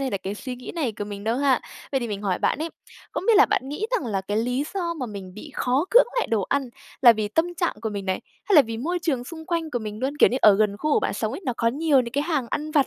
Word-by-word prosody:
hay 270 -2 -1
là 200 - 0
cái 195 +2 -5
suy 255 +4 -6
nghĩ 250 - -8
này 275 -9 -1
của 205 - -2
mình 205 0 -7
đâu 225 +2 +1
ha. 270 -2 +3 0.3
Vậy 270 - +1
thì 235 - -3
mình 205 -1 -4
hỏi 190 -3 0
bạn - - +1
ấy, 320 +2 -3 0.4
không - - -3
biết 460 -2 +6
là 415 - +8
bạn 265 - 0
nghĩ 335 +10 -3
rằng - - 0
là 195 -3 -1
cái 205 +2 -3
lý 250 +5 0
do 345 -3 -1
mà 265 -6 -4
mình 195 -3 -8
bị 295 +8 -10
khó 260 +6 +1
cưỡng 485 +1 +7
lại - - +1
đồ 220 -4 0
ăn 280 -2 0 0.3
là 240 - +10
vì 215 -2 -2
tâm 330 +9 0
trạng 345 0 0
của 220 - -1
mình 200 -2 -5
này, 185 - -1 0.2
hay 415 - +1
là 295 - +10
vì 225 -2 -5
môi 345 +10 -2
trường 275 -8 -1
xung 320 +2 -9
quanh 335 -3 -2
của 245 - -1
mình 215 -1 -6
luôn? 275 +3 -2
Kiểu - - +6
như, 250 - -1
ở 210 - +7
gần 210 -1 +1
khu 305 -1 0
của - - +4
bạn - - -1
sống 220 0 -2
ấy, 275 - -5
nó 250 - +1
có 230 - +2
nhiều 285 +2 +3
những 235 -2 -5
cái 285 +1 +1
hàng 305 -7 -1
ăn 300 +1 -2
vặt 290 -3 +3
255 Hz, 315 wpm, -24 LUFS, 215-310 Hz, 0.4 s, là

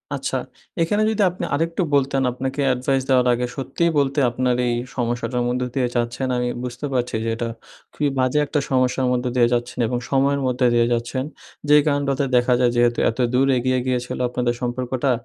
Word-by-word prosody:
আচ্ছা, - - -2 0.4
এখানে 205 +6 +1
যদি 220 -1 0
আপনি 180 - -5
আরেকটু 165 +4 -1
বলতেন, 135 -1 +1
আপনাকে 130 +3 -3
অ্যাডভাইস 130 +1 +1
দেওয়ার 125 -1 +4
আগে। 125 +1 -1
সত্যিই 170 +5 -1
বলতে 140 +1 +1
আপনার 125 +1 0
এই 120 - +1 0.2
সমস্যাটার 120 0 -1
মধ্য 125 +1 -1
দিয়ে 130 -2 +1
যাচ্ছেন, 120 +2 -1
আমি 125 0 0 0.2
বুঝতে 125 +3 -5
পারছি 125 -2 -1
যে 115 - -1
এটা 115 +1 -3 0.5
খুবই 145 - 0
বাজে 130 +3 +1
একটা 145 +1 -1
সমস্যার 130 0 +1
মধ্যে 125 0 0
দিয়ে 120 -2 +4
যাচ্ছেন 120 +1 -2
এবং 125 - -1
সময়ের 140 +1 +2
মধ্যে 125 0 +1
দিয়ে 120 0 +3
যাচ্ছেন। 120 +2 -2 0.5
যে 150 - +7
কারনটাতে 140 -1 +1
দেখা 125 +1 +3
যায়, 125 -1 +3
যেহেতু 120 0 +2
এত 115 - -6
দূর 130 +2 +3
এগিয়ে 130 +1 +1
গিয়েছিলো 125 -1 -2
আপনাদের 120 0 -1
সম্পর্কটা, 125 +2 -1
125 Hz, 180 wpm, -22 LUFS, 120-135 Hz, 0.5 s, যে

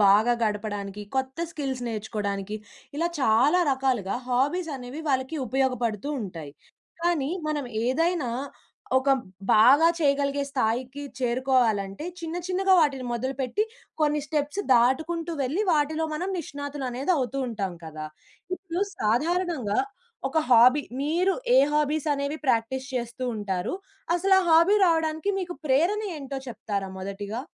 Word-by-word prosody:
బాగా 215 +5 +5
గడపడానికి 205 -1 -3 0.2
కొత్త 265 +3 -3
స్కిల్స్ 270 -5 -3
నేర్చుకోవడానికి, 210 -2 -3 0.4
ఇలా 340 - +1
చాలా 260 +9 +4
రకాలుగా 255 -7 0
హాబీస్ 290 +6 +1
అనేవి 255 +5 -7
వాళ్ళకి 260 +4 0
ఉపయోగపడుతూ 245 -2 0
ఉంటాయి. 165 -7 -7 0.5
కానీ 325 -5 +1 0.2
మనం 295 -2 -2 0.2
ఏదైనా 325 0 +1 0.7
ఒక 265 +1 +3 0.4
బాగా 270 +9 +7
చేయగలిగే 280 -2 +1
స్థాయికి 255 +2 -1 0.2
చేరుకోవాలంటే, 240 -4 +1 0.2
చిన్న 330 +1 -4
చిన్నగా 380 +1 +2
వాటిని 280 -5 +2
మొదలుపెట్టి 260 - -1 0.4
కొన్ని 300 0 +2
స్టెప్స్ 300 +5 -1
దాటుకుంటూ 315 +8 +2
వెళ్లి 290 +11 0
వాటిలో 310 0 +1
మనం 350 +5 -2
నిష్ణాతులు 285 -2 -5
అనేది 265 +9 0
అవుతూ 270 0 -2
ఉంటాం 200 -6 -3
కదా! 155 -1 -6 0.5
ఇప్పుడు 370 -1 -3 0.2
సాధారణంగా 300 - 0 0.5
ఒక 320 - 0
హాబీ 250 +4 +7 0.2
మీరు 350 +6 +2 0.2
ఏ - - +8 0.2
హాబీస్ 300 +1 +1
అనేవి 280 +2 -3
ప్రాక్టీస్ 260 +2 +1
చేస్తూ 240 +1 -3
ఉంటారు? 195 - -2 0.4
అసలు 385 +2 +3
ఆ - - 0
హాబీ 335 +5 +6
రావడానికి 320 +2 +1
మీకు 360 -2 -4
ప్రేరణ 335 +11 +3 0.2
ఏంటో 275 -1 -5
చెప్తారా 200 -4 -4
మొదటిగా? 200 +4 -5
265 Hz, 120 wpm, -26 LUFS, 230-315 Hz, 0.7 s, ఏ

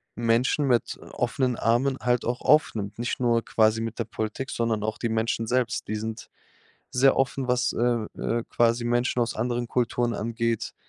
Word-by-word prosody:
Menschen 120 +5 +1
mit, 120 -3 +1
äh, - - -13
offenen 125 0 -1
Armen 125 +4 +1
halt 125 0 +1
auch 120 +1 -2
aufnimmt, 110 -9 +2
nicht 120 - -2
nur 120 -2 +2
quasi 110 0 +3
mit 115 0 -4
der - - +1
Politik, 110 +5 -4
sondern 115 -2 -1
auch 110 0 -2
die 115 - -2
Menschen 115 0 -1
selbst. 125 0 0
Die 110 - -2
sind 110 +1 -5 0.6
sehr 135 +2 +4
offen, 135 0 0
was, 125 0 +1
äh, 120 -2 +1
äh, 115 0 -1
quasi 120 0 +2
Menschen 120 +1 +1
aus 115 - -1
anderen 120 +1 -1
Kulturen 120 0 0
angeht. 115 0 -2
120 Hz, 175 wpm, -26 LUFS, 115-125 Hz, 0.6 s, sehr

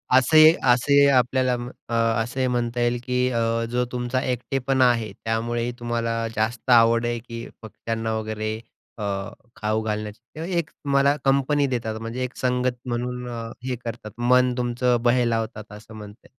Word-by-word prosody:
असे 130 +5 +5
ही 155 +1 +9 0.2
असे 130 +3 +2
ही 140 - +6
आपल्याला 130 -1 +2
म 120 0 -6 0.2
अ, - - -4
असे 115 +2 0
ही 130 - +2
म्हणता 120 -1 -1
येईल, 120 0 +1
की 125 0 0
अ, 115 - 0 0.3
जो 125 0 +1
तुमचा 125 +1 -1
एकटेपण 130 +1 -1
आहे 115 -4 +3
त्यामुळे 115 +2 -2
ही 120 - -2
तुम्हाला 115 -1 -2
जास्त 115 +3 -2
आवड 115 0 +5
आहे, 120 0 -1
की 115 0 -8
पक्ष्यांना 115 0 -4
वगैरे 110 0 -3 0.4
अ, 105 - -5 0.5
खाऊ 110 +1 -1
घालण्याची 105 0 -4 0.2
ते - - -8
म्हणजे 175 0 -2
एक 160 -2 -1
तुम्हाला 140 0 +3
कंपनी 140 +1 +2
देतात 115 -3 -3
म्हणजे 115 +3 -4
एक 125 - -5
संगत 125 -1 0
म्हणून 125 0 -3
अ, 115 -1 -5 0.2
हे 130 -1 -1
करतात. 110 -2 -6
मन 125 +1 +3
तुमचं 125 0 +1
बहलावतात 115 -3 0
असं 105 +1 -12
म्हणता 105 0 -10
येइल. - - -19
120 Hz, 175 wpm, -24 LUFS, 115-125 Hz, 0.5 s, ही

